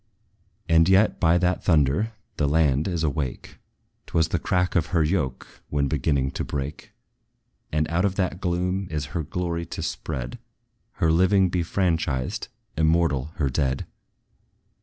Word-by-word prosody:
And 80 +1 +5
yet, 95 +3 +4
by 85 +1 +4
that 90 +1 +1
thunder, 80 +7 +2 0.2
the 75 - +2
land 75 -1 +2
is 85 -4 -1
awake: 75 -4 -3 0.5
'T - - -16
was 80 -2 +3
the - - 0
crack 90 0 0
of 85 -4 +2
her 80 0 +2
yoke 75 -6 -2
when 70 -1 +1
beginning 70 -1 0
to - - -3
break! 70 0 -5 0.8
And 75 0 +1
out 85 +2 0
of 100 -2 +1
that 90 -1 -1
gloom 90 +1 -1
is 75 -2 -2
her 85 - 0
glory 85 +1 -3
to - - -5
spread; 65 0 -4 0.5
Her 80 - +1
living 95 +3 +4
be 90 0 0
franchised, 85 - -1 0.3
immortal 80 -2 +1
her 70 -4 0
dead. 65 -1 0
80 Hz, 150 wpm, -25 LUFS, 70-90 Hz, 0.8 s, And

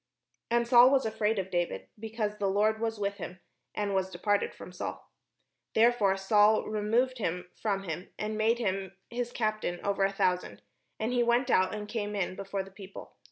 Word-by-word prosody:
And 235 0 +2
Saul 240 +1 +8
was 270 -2 +3
afraid 220 0 0
of 190 -1 -3
David, 175 -1 -1
because 215 -1 -3
the 200 -1 +1
Lord 215 +3 +2
was 225 -1 -1
with 200 0 -2
him, 180 +1 -7 0.4
and 205 -1 -1
was 190 -1 0
departed 200 +3 0
from - - -11
Saul. 180 - -6 0.7
Therefore 220 -4 +4
Saul 210 +2 +4
removed 230 +4 0
him 180 -2 -3
from 200 -3 0
him, 175 +1 -5
and 215 0 -3
made 220 +2 +2
him 195 -4 -2
his 240 0 -3
captain 215 -7 -1
over 200 -1 +1
a 195 - +2
thousand; 185 -2 -1 0.4
and 225 +3 -1
he 245 - +3
went 240 +2 +2
out 185 +3 +3
and 210 -1 -6
came 210 -1 -3
in 190 -2 -1
before 195 0 -3
the 195 - -14
people. 195 0 -11
210 Hz, 185 wpm, -30 LUFS, 195-225 Hz, 0.7 s, Saul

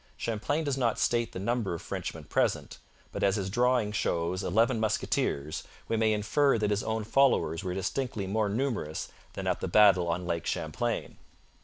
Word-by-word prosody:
Champlain 115 +8 -1
does 140 -3 -1
not 120 -3 +1
state 120 -1 +1
the - - -7
number 105 -1 -1
of 85 - -7
Frenchmen - - -5
present, - - -1 0.3
but - - -5
as 100 -1 +3
his 95 -2 -2
drawing 120 -1 +2
shows 90 -3 -1
eleven 110 +5 +2
musketeers, 75 -8 -1 0.3
we 115 - 0
may 110 -1 +3
infer 115 +6 +2
that 105 -1 0
his 105 0 +1
own 110 -1 -2
followers 110 -8 +2
were 90 -1 -3
distinctly 100 +2 -2
more 105 +2 0
numerous 110 - -2 0.2
than - - -5
at - - 0
the - - -3
battle 95 -2 +5
on 85 +1 -1
Lake 85 -2 -2
Champlain. - - -2
105 Hz, 175 wpm, -29 LUFS, 95-115 Hz, 0.3 s, battle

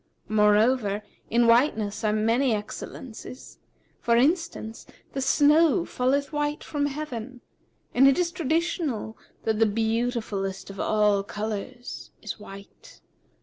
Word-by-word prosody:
Moreover, 210 0 +3 0.3
in 235 +1 +3
whiteness 230 -4 +2
are 215 - +2
many 225 +3 +2
excellences; 220 +4 -8 0.4
for 235 - +2
instance, 285 -5 0 0.3
the 270 - -2
snow 315 +5 +4
falleth 280 +4 0
white 295 0 -1
from 285 -1 -1
heaven, 260 -4 -6 0.5
and 270 +2 +6
it 275 - +4
is 350 -1 +1
traditional 320 - -1 0.3
that 220 -1 0
the 225 - +5
beautifullest 220 -3 -2
of 195 - -11
a 210 -2 +2
colours 220 +4 -6 0.3
white. 200 -1 -13
235 Hz, 110 wpm, -26 LUFS, 215-285 Hz, 0.5 s, and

